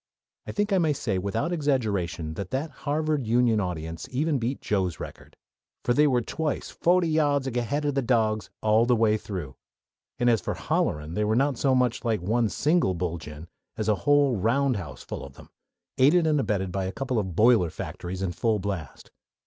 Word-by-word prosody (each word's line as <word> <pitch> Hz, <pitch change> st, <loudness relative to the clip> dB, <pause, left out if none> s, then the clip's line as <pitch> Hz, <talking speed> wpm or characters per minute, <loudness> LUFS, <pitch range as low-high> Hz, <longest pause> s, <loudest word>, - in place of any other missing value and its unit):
I -, -, -3 dB
think 205 Hz, 0 st, 0 dB
I 190 Hz, -, +4 dB
may 160 Hz, -3 st, +2 dB
say 100 Hz, -8 st, -2 dB
without 110 Hz, -, -1 dB
exaggeration 105 Hz, -, -1 dB
that 95 Hz, +2 st, -5 dB
that 145 Hz, +4 st, -2 dB, 0.2 s
Harvard 150 Hz, -4 st, 0 dB
Union 115 Hz, -1 st, +3 dB
audience 85 Hz, -1 st, -4 dB
even 140 Hz, +2 st, 0 dB
beat 120 Hz, +4 st, -2 dB
Joe's 95 Hz, -5 st, -1 dB
record; -, -, -10 dB, 0.5 s
for 120 Hz, -, +3 dB
they 150 Hz, +3 st, +4 dB
were 125 Hz, -4 st, +2 dB
twice 155 Hz, +5 st, -3 dB
"fohty 175 Hz, -2 st, +2 dB
yahds 145 Hz, -3 st, +2 dB
ahead 140 Hz, +5 st, -1 dB
o' 145 Hz, -, +2 dB
de 135 Hz, 0 st, 0 dB
dawgs" 110 Hz, -3 st, +1 dB
all 110 Hz, +2 st, +4 dB
the 125 Hz, -, +4 dB
way 110 Hz, -1 st, +3 dB
through, 90 Hz, -10 st, -6 dB, 0.6 s
and 120 Hz, -, +1 dB
as 115 Hz, -2 st, +4 dB
for -, -, -3 dB
"hollerin'" 75 Hz, +2 st, -1 dB
they 105 Hz, -, 0 dB
were 105 Hz, +1 st, +1 dB
not 135 Hz, +2 st, +2 dB
so 135 Hz, -2 st, +3 dB
much 125 Hz, -2 st, +1 dB
like 115 Hz, -3 st, +1 dB
one 110 Hz, +5 st, +1 dB
single 150 Hz, -, +1 dB
"bullgine" 80 Hz, -3 st, -5 dB, 0.3 s
as 110 Hz, 0 st, -1 dB
like 105 Hz, -, +4 dB
a -, -, -11 dB
whole 145 Hz, -4 st, +3 dB
roundhouse 110 Hz, -, 0 dB
full -, -, -6 dB
of 70 Hz, -1 st, -10 dB
them, -, -, -15 dB, 0.5 s
aided 155 Hz, +6 st, +5 dB
and 155 Hz, -2 st, +2 dB
abetted 95 Hz, -7 st, -1 dB
by 95 Hz, 0 st, -2 dB
a 95 Hz, -, -3 dB
couple 130 Hz, 0 st, -2 dB
of 95 Hz, -5 st, -4 dB
boiler 110 Hz, -5 st, +5 dB
factories 90 Hz, +4 st, -6 dB
in 95 Hz, -, -1 dB
full 110 Hz, +3 st, 0 dB
blast. 95 Hz, -7 st, -5 dB
115 Hz, 195 wpm, -26 LUFS, 95-140 Hz, 0.6 s, aided